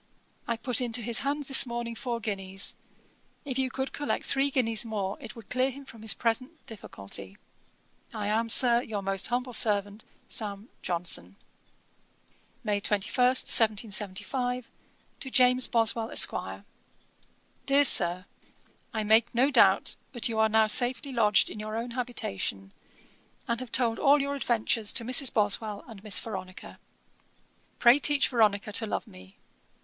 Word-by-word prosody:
I 235 -1 -1
put 245 +1 +2
into 240 -1 -2
his 230 0 0
hands 285 0 -3
this 270 -1 +6
morning 235 0 -5
four 235 0 -4
guineas. 195 -3 -3 0.7
If 265 -2 -4
you 260 -1 0
could 265 +1 -5
collect 290 - -3
three 275 +1 +1
guineas 230 -5 +1
more, 205 -4 -4
it 235 -5 -9
would 230 -3 -14
clear 255 +1 +1
him 275 +1 -11
from 225 -4 -14
his 220 - -1
present 255 +7 -2
difficulty. 100 - -8 0.7
'I 210 -2 -5
am, 225 +2 0
Sir, 240 0 +4
'Your 210 -4 -5
most 195 0 0
humble 250 +1 -3
servant, 205 -1 0 0.2
'SAM. 210 +1 -5
JOHNSON.' 170 - -2 1.3
'May 205 -1 -1
21, 200 0 -2
1775.' 225 0 0 0.5
'To 265 - -5
JAMES 250 0 +4
BOSWELL, 225 0 +2
ESQ. - - +1 1.0
'DEAR 280 +1 +4
SIR, 180 -6 +4 0.7
'I 220 - -1
make 220 +3 +3
no 260 +4 +3
doubt - - +3 0.2
but 240 -4 +1
you 225 -2 -3
are 220 0 +3
now 220 0 +4
safely 250 +5 +1
lodged 215 -4 +3
in 210 - -9
your 215 +1 -5
own 235 +1 -5
habitation, 100 - -4 0.7
and 235 0 -2
have 255 -3 -8
told 230 -2 +1
all 290 0 +4
your 280 0 -2
adventures 230 -5 -1
to 235 - 0
Mrs. 255 +1 +2
Boswell 210 0 +1
and 215 -4 -12
Miss 210 -4 +4
Veronica. 185 -4 -8 1.0
Pray 240 +3 +5
teach 290 -1 +2
Veronica 210 -4 +1
to 220 +2 0
love - - -3
me. 95 +1 -16
230 Hz, 150 wpm, -27 LUFS, 205-250 Hz, 1.3 s, this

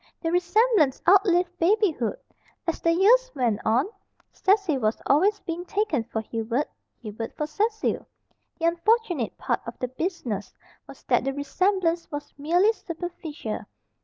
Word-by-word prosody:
The 330 - -2
resemblance 355 - +3
outlived 360 -2 +4
babyhood. 340 - +2 0.5
As 335 - -2
the 335 - +3
years 465 +9 +5
went 235 -6 +1
on, 230 +4 +3 0.5
Cecil 380 -8 +2
was 215 -1 0
always 390 +9 +3
being 335 +1 -4
taken 360 - -1
for 220 -1 -3
Hubert, 230 +5 -2 0.4
Hubert 225 +1 -6
for 300 - -1
Cecil. 430 +8 -1 0.5
The 330 - -2
unfortunate 345 - +1
part - - -1
of 230 - -7
the 250 - -3
business 255 - -4 0.3
was - - -13
that - - +2
the 270 - -1
resemblance 340 +4 0
was 290 0 -6
merely 350 +9 +3
superficial. 335 - -6
335 Hz, 135 wpm, -25 LUFS, 265-385 Hz, 0.5 s, years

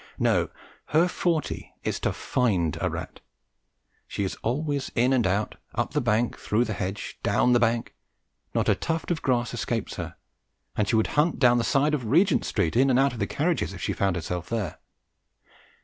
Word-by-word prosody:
No, - - +2 0.4
her 165 +4 +3
forte 170 -3 -2
is - - -1
to - - 0
find 95 - 0
a - - +1
rat. - - -6 0.9
She 100 - -3
is 95 - -2
always 140 +3 -1
in 125 +3 +3
and 120 -6 +3
out, 100 +3 -1 0.2
up - - -1
the 150 - +1
bank, 115 0 +1
through 115 +4 +1
the 110 - -3
hedge, 95 +2 -4
down 125 - +3
the 120 - +5
bank; 115 0 +1 0.6
not - - +1
a - - +5
tuft 165 +1 -2
of 165 - -1
grass 120 -2 0
escapes 120 -1 -3
her, - - -5 0.6
and 105 - +1
she 115 - +2
would 110 - +3
hunt 155 +3 +2
down 120 -3 +5
each 115 - 0
side 145 +2 +2
of 135 -5 -1
Regent 170 - +3
Street 80 - 0
and 125 - +5
in 135 - +4
and 125 - +4
out 135 0 +3
of 120 - -7
the 100 - 0
carriages - - 0
if - - -9
she - - 0
found 95 -2 +1
herself 90 0 -4
there. 110 -4 -3
120 Hz, 195 wpm, -26 LUFS, 105-140 Hz, 0.9 s, the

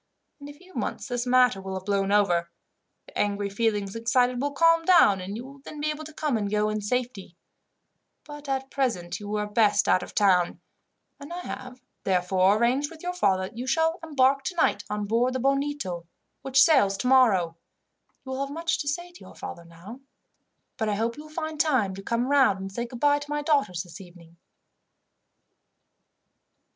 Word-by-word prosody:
In 285 0 -10
a - - -9
few 370 +5 -19
months - - -4
this 245 -1 -3
matter 250 -4 +4
will 190 0 -5
have 190 0 -6
blown 200 -1 0
over, 175 -5 +2 0.6
the - - -18
angry 205 -1 -1
feelings 205 -2 -1
excited 245 +2 +1
will 285 +1 -1
calm 330 +3 +4
down, 325 - +5
and 195 +3 -5
you 240 - -7
will 275 +1 -13
then 295 +2 -10
be 305 +1 0
able 305 +1 -7
to 315 - -9
come 300 -5 -1
and 205 -2 -2
go 210 +1 +1
in 215 0 -2
safety; 215 -5 -3 0.9
but 295 -1 -10
at 270 0 -2
present 230 -11 -2
you 205 -1 -8
were 210 0 -1
best 210 0 +2
out 185 - +4
of - - -8
the - - -16
town, 185 -4 +3 0.6
and 285 +3 -10
I 355 +1 -5
have, 255 -5 -8 0.2
therefore, 185 +2 +2
arranged 255 +6 +1
with 325 0 -13
your 360 0 -2
father 190 - +1
that 190 +4 -8
you 255 - -4
shall 325 +4 +1
embark 275 -3 +2
tonight 345 +2 0
on 210 0 -2
board 235 +4 +1
the 260 - -2
Bonito, 275 -10 -1 0.3
which 270 0 +1
sails 235 -12 +4
tomorrow. 215 -9 +3 0.7
You 265 - -6
will 260 - -3
have 275 - -2
much 330 +3 -2
to 290 - -4
say 345 +5 -3
to 350 - -16
your - - -13
father 170 - -8
now, 170 +9 -12 0.8
but 220 -3 -1
I 205 - 0
hope 230 +2 -1
you 300 - -10
will - - -13
find 315 -1 -5
time 260 -12 +2
to 195 - -8
come 235 +4 -1
round, 270 -8 +3
and 195 0 -6
say 235 +4 -4
goodbye 285 +4 +1
to 290 0 -10
my 295 0 -2
daughters, 275 - +1
this 175 +1 -12
evening." 170 -2 -16
245 Hz, 195 wpm, -26 LUFS, 200-290 Hz, 0.9 s, down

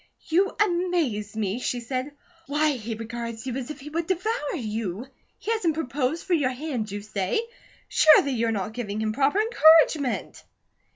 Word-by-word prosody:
"You 375 +5 +3
amaze 345 - 0
me," 210 +1 -1
she 250 -1 -2
said. 255 +4 -4 0.4
"Why, 300 +2 +2
he 230 -4 -4
regards 230 +1 -6
you 255 -2 -3
as 260 0 -4
if 300 -1 -7
he 300 +2 -9
would 330 +1 -2
devour 375 -3 -1
you. 220 - -4 0.3
He 450 - -3
hasn't 360 -9 +1
proposed 290 0 -2
for 370 - 0
your 290 -6 +2
hand, 255 -4 -4
you 205 +1 -5
say? 200 - -1 0.5
Surely 310 -2 +6
you're 230 -2 0
not 210 0 -3
giving 215 -3 -4
him 215 0 -1
proper 280 - +2
encouragement!" 315 - +4
260 Hz, 165 wpm, -25 LUFS, 225-320 Hz, 0.5 s, Surely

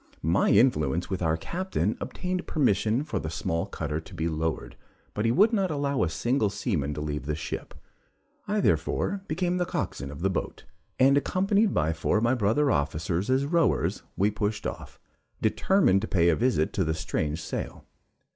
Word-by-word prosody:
My 85 +5 +2
influence 85 - +3
with 95 - -2
our 80 -1 +1
captain 185 - -2
obtained 180 -1 -3
permission 115 -2 +1
for 150 - -3
the 80 - -4
small 85 +3 -2
cutter 80 -5 -3
to - - -14
be 80 - -1
lowered, 80 -1 -3 0.4
but 105 - -1
he 115 - +3
would 210 - +4
not 195 -4 +1
allow 140 -2 -1
a 90 - +2
single 120 +4 +1
seaman 90 - -2
to 75 - -4
leave 75 -1 -4
the 75 - 0
ship. 80 - -6 0.7
I 210 0 +1
therefore 200 0 0
became 180 +2 -1
coxswain 70 - -3
of 70 +2 -9
the 95 - +2
boat, - - -4 0.3
and, 135 +2 +5
accompanied 195 +6 +1
by 80 +2 +2
four 80 +6 0
of 110 - 0
my 120 +2 +3
brother 125 +5 +2
officers 80 - -1
as 130 +2 +2
rowers, 165 -4 +1 0.2
we 100 +3 +3
pushed 105 +1 -2
off, - - -6 0.4
determined 190 - +3
to 110 - -3
pay 85 -2 +3
a 85 - +4
visit 120 -9 +1
to 95 - +1
the 80 -1 -1
strange 80 0 -2
sail. 80 - -5
105 Hz, 180 wpm, -27 LUFS, -, 0.7 s, and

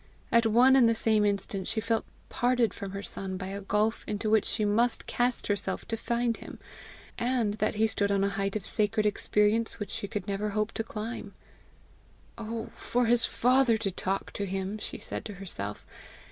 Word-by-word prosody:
At 235 -1 +5
one 245 +4 +6
and 245 -4 +6
the 230 - +2
same 220 -1 +2
instant 200 -2 0
she 220 - -1
felt 225 0 0 0.2
parted 245 -4 +1
from 200 - -6
her 200 +1 -6
son 190 -2 -3
by 185 0 -5
a 200 +1 -5
gulf 210 +3 0
into 210 +1 -1
which 220 -1 +4
she 215 - +1
must 230 +4 +2
cast 245 0 0
herself 200 -2 -2
to 225 - 0
find 235 0 -1
him, - - -10 0.6
and 235 -4 +1
that 215 - +1
he 220 +1 +3
stood 200 -2 0
on 200 -1 +2
a 200 - +2
height 195 0 -2
of 210 - -3
sacred 215 0 +1
experience 210 +2 +2
which 210 -2 -5
she 200 - -2 0.2
never 200 +1 -2
could 205 - -4
hope 215 +1 0
to 225 - -3
climb. 225 +1 -6 1.0
"Oh 225 0 -5
for 245 0 0
his 240 +1 +4
father 250 -1 +3
to 210 -3 -2
talk 190 +1 -2
to 200 - -3
him!" 195 +2 -3
she - - -5
said - - -6
to 210 - -6
herself. 105 - -5
215 Hz, 195 wpm, -29 LUFS, 200-230 Hz, 1.0 s, one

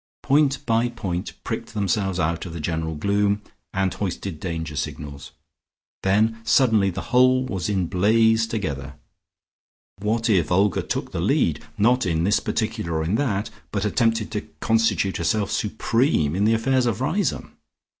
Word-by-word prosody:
Point 140 -1 +2
by 115 +1 +2
point 90 -7 -4
pricked - - -5
themselves 95 -2 0
out 85 +2 -1
of 85 - -8
the 85 - -6
general 80 0 -2
gloom, 100 +4 +1 0.3
and 95 -1 0
hoisted 95 -3 -4
danger 80 -4 -4
signals; 70 0 -5 0.7
then 110 +4 +2
suddenly 110 -5 +4
the 95 +6 -6
whole 130 +1 +5
was 95 -6 -3
in 95 -3 +1
blaze 110 +5 +3
together. 75 - -4 1.0
What 110 +3 0
if 90 -8 +2
Olga 95 +1 +3
took - - -4
the - - -3
lead, - - +1
not 120 +1 +3
in 80 -1 0
this 100 +4 +3
particular 110 -6 -2
or 80 - 0
in 85 +5 -1
that, 110 -4 0 0.2
but 105 0 -1
attempted 115 0 +1
to 105 - -2 0.2
constitute 115 -4 +1
herself 95 +5 0
supreme 110 - +1
in 100 +2 +1
the 110 +1 +4
affairs 130 +2 +1
of 115 -2 -1
Riseholme? 165 +5 -1
105 Hz, 155 wpm, -23 LUFS, 90-115 Hz, 1.0 s, whole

